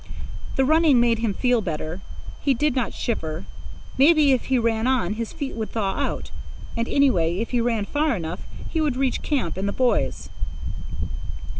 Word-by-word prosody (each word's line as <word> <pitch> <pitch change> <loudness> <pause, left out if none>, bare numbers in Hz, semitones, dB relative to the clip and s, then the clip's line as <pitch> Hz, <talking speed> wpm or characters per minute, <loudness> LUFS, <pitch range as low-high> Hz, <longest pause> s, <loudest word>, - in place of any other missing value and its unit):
The 265 - +3
running 310 -3 +5
made 235 -1 +3
him 225 -4 0
feel 245 -2 +2
better. 160 0 -4 0.4
He 275 -2 +2
did 295 +2 +1
not 250 -5 0
shiver. 160 -8 -3 0.5
Maybe, 300 0 +6
if 255 - +2
he 265 - +2
ran 230 0 +1
on, 245 -8 +2
his 225 +1 -4
feet 285 -4 -4
would 220 -1 -3
thaw 200 -4 0
out; - - -2 0.4
and, 230 0 -1
anyway, 180 - +3
if 225 +3 -2
he 245 -2 +2
ran 230 -3 +1
far 295 +2 +1
enough, 170 -1 -4 0.3
he 325 - +1
would 290 -5 +1
reach 265 -1 +1
camp 285 - -1
and 195 +1 -1
the - - 0
boys. 255 -2 +1
240 Hz, 175 wpm, -24 LUFS, 205-270 Hz, 0.5 s, Maybe